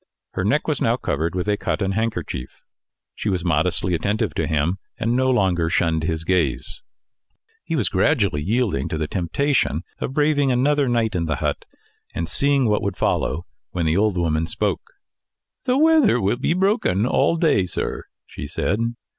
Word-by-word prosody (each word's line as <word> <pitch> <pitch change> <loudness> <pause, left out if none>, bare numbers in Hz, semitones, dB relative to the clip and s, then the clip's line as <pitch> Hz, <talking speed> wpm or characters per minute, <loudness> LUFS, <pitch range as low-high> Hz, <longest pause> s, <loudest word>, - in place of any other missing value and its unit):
Her - - -2
neck - - +1
was - - -1
now - - +2
covered 80 +4 -2
with 90 +2 -2
a 105 0 +1
cotton 100 -1 -1
handkerchief. 95 - -3 0.5
She 105 - -3
was 90 -3 -1
modestly 90 0 +1
attentive 105 +2 -1
to - - -1
him, 80 +5 0 0.2
and 115 +2 0
no 130 +1 +2
longer 95 -9 +2
shunned 80 -2 +1
his 80 -1 -2
gaze. 85 - -1 0.8
He 165 - -3
was 120 - +1
gradually 95 - +1
yielding 115 +6 0
to 80 - -2
the 80 - -1
temptation 90 - 0 0.2
of 130 - -3
braving 145 -2 +2
another 140 +2 +2
night 115 -2 +1
in 85 -3 -1
the 75 -2 -1
hut, - - -2 0.5
and 85 - -2
seeing 140 +6 +2
what 105 -1 +1
would 100 -2 -3
follow, 85 +3 0 0.3
when 85 -2 -1
the 80 +1 +2
old 105 -2 +2
woman 80 -1 0
spoke. - - -2 0.7
"The 255 +1 +2
weather 310 - +4
will 100 +3 +1
be 150 +6 0
broken 185 - +1
all 140 +5 +2
day, 150 - +2
sir," - - -4 0.2
she 70 - -8
said. 100 +8 -1
100 Hz, 170 wpm, -22 LUFS, 85-130 Hz, 0.8 s, weather